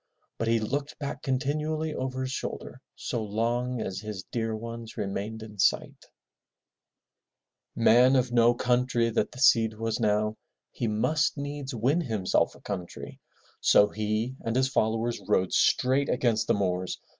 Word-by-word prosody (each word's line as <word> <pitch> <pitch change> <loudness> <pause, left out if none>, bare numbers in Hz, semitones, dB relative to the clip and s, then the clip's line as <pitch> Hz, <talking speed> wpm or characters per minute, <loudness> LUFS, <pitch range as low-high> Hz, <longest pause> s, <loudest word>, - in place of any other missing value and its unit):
But 115 - -1
he 115 0 +3
looked 140 +7 -3
back 140 -1 -5
continually 150 +4 -1
over 130 0 -3
his 130 0 -3
shoulder - - -5
so 115 - -3
long 120 +4 -1
as 95 -3 -4
his 105 -3 -6
dear 115 -2 -1
ones 115 0 -8
remained 105 +3 -4
in 105 -2 -12
sight. - - +2
Z^7 - - -33
MY 115 - -3
BOOK - - +1
HOUSE - - +5
Man 130 +2 +5
of 125 -1 +1
no 120 0 +5
country 125 -1 +1
that 115 - 0
the - - -13
Cid 115 -4 +4
was 115 0 -2
now, 105 -1 +1 0.3
he 120 - -3
must 145 +9 +1
needs 140 -2 -5
win 135 +9 +1
himself 110 - 0
a - - -17
country. 90 -4 -7 0.4
So 105 - +5
he 110 +4 -2
and 115 0 -2
his 130 +1 +2
followers 115 -1 0
rode 95 0 +1
straight 130 +2 +3
against 115 -3 +1
the 115 - +3
Moors. 90 -2 -1
115 Hz, 165 wpm, -27 LUFS, 110-130 Hz, 0.4 s, HOUSE